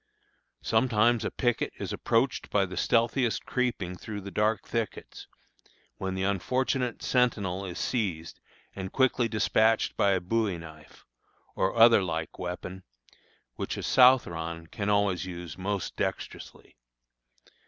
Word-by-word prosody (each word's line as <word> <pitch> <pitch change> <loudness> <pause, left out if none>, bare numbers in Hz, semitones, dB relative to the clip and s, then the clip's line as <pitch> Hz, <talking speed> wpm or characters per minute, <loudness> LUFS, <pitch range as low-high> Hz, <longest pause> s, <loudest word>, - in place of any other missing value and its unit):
Sometimes 115 0 +2
a - - -1
picket 120 -2 -1
is - - -4
approached 120 +3 0
by 100 -1 +2
the 90 0 -8
stealthiest 115 +5 +1
creeping 115 -8 -2
through 105 +3 -7
the 100 +1 -8
dark 105 +2 0
thickets, 115 -3 -4 0.7
when 95 -1 -3
the 95 - -2
unfortunate 125 +5 -1
sentinel 105 -7 +1
is 90 - -6
seized 90 -9 -2 0.4
and 95 -1 -5
quickly 130 -2 +2
despatched 110 0 +2
by 100 -1 +3
a 95 - +1
bowie 100 0 0
knife, 80 -2 -13 0.5
or 95 +3 0
other 115 -2 +7
like 80 -3 -4
weapon, 90 +1 -5 0.8
which - - -3
a - - -5
Southron 85 -11 +3
can 100 +5 -4
always 100 -3 +1
use 85 -3 -7
most 95 0 -3
dexterously. - - -5
100 Hz, 130 wpm, -28 LUFS, 90-115 Hz, 0.8 s, other